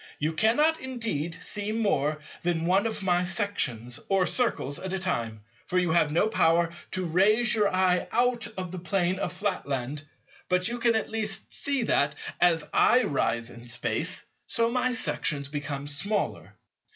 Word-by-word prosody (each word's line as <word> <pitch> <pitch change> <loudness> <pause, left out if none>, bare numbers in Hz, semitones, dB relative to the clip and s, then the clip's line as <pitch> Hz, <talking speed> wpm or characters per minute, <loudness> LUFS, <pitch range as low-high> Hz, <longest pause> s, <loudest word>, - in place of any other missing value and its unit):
You 155 +2 -1
cannot 295 - +3
indeed 225 - -3
see 210 0 -3
more 155 -9 0 0.2
than 170 -2 0
one 190 +5 +3
of 220 -3 -4
my 180 -1 +2
sections, 160 - -1
or 195 -2 +3
Circles, 175 - 0
at 190 0 -5
a - - 0
time; 115 - -3 0.2
for 180 - -1
you 180 -2 +2
have 160 -2 +3
no 170 +7 +3
power 170 -5 +3 0.2
to 185 -1 -2
raise 210 +7 +3
your 210 -3 +2
eye 185 -1 +2
out 240 0 +1
of 185 -2 -4
the 185 - -5
plane 185 0 0
of 175 - -2
Flatland; 145 -8 -3 0.5
but 180 0 +2
you 240 +1 -4
can 235 -1 +3
at 220 - -1
least 215 -3 -3
see 280 -3 0
that, 145 -9 +2 0.2
as 165 -3 +3
I 250 +1 +5
rise 120 - -1
in 120 0 -12
Space, 120 0 -1 0.2
so 230 0 +2
my 250 0 +1
sections 145 - 0
become 145 -1 -4
smaller. 195 +9 -3
185 Hz, 165 wpm, -27 LUFS, 150-220 Hz, 0.5 s, I